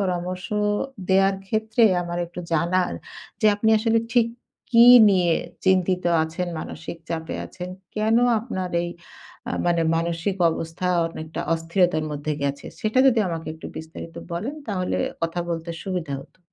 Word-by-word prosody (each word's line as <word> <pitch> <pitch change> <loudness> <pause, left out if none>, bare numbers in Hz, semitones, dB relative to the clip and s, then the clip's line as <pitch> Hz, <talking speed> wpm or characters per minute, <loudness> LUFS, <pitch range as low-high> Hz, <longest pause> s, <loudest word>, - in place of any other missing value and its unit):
পরামর্শ 185 -1 -2 0.6
দেওয়ার 195 +1 +4
ক্ষেত্রে 220 +3 0 0.2
আমার 175 0 -4
একটু 175 +1 -8
জানার 175 +3 +1 0.5
যে 215 - +4
আপনি 220 +1 +2
আসলে 225 +1 +2
ঠিক 240 -2 +4 0.5
কী 235 0 +8 0.3
নিয়ে 175 -4 +3 0.3
চিন্তিত 185 -1 +2 0.2
আছেন, 170 +3 -4
মানসিক 165 +1 -7
চাপে 160 -1 -3
আছেন? 180 0 -8 0.3
কেন 215 +1 +2 0.2
আপনার 190 -6 -4
এই 175 - -3 0.6
আ - - -2
মানে 170 -1 +2
মানসিক 170 +3 -1
অবস্থা 165 +2 -4 0.2
অনেকটা 160 -1 -6
অস্থিরতার 165 -1 +1
মধ্যে 145 +1 -3
গেছে? 140 0 -2
সেটা 220 +4 0
যদি 245 -3 +4
আমাকে 165 -2 -4
একটু 160 - -9
বিস্তারিত 160 +1 -8 0.2
বলেন, 220 - -3
তাহলে 185 -3 -1 0.3
কথা 165 +1 -1
বলতে 165 0 -3
সুবিধা 180 -7 -3
হতো। 135 - -23
180 Hz, 140 wpm, -24 LUFS, 165-195 Hz, 0.6 s, কী